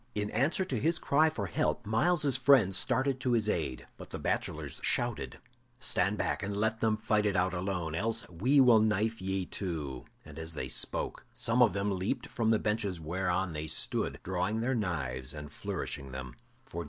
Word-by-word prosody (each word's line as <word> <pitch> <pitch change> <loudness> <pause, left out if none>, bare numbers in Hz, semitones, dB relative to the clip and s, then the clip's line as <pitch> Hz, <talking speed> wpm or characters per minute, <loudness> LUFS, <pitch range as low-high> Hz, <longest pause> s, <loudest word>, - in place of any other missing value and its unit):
In 105 0 -1
answer 150 - +1
to 185 - -2
his 165 +2 +1
cry 155 +1 +3
for 105 -10 -4
help, 85 - -1
Myles's 140 +6 +2
friends 130 -8 +5
started 130 +4 +1
to 125 -1 0
his 110 -3 +2
aid. 80 -11 -2
But - - -10
the - - -5
bachelors - - -3
shouted, - - +1 0.4
"Stand 105 -4 +1
back - - -1
and 100 0 -3
let 110 +1 0
them 110 -1 +2
fight 105 -1 +1
it 100 - 0
out 90 0 +2
alone, 90 -3 -2
else 110 +7 -1
we 120 - +2
will 120 -4 +7
knife 110 +1 +1
ye 95 0 -1
too." 75 -11 -4 0.2
And 75 +1 -10
as 80 0 -5
they - - -3
spoke, - - -1
some 115 +2 +1
of 120 - +6
them 100 +1 0
leaped 115 +7 -2
from 115 -2 -1
the 110 - +5
benches 105 -4 -1
whereon 90 +2 -1
they 75 0 -4
stood, - - -2
drawing 95 +5 -1
their 130 +3 0
knives 75 - -3
and 75 -1 -8
flourishing 70 -2 -5
them. 65 -1 -6
105 Hz, 185 wpm, -31 LUFS, 90-115 Hz, 0.4 s, will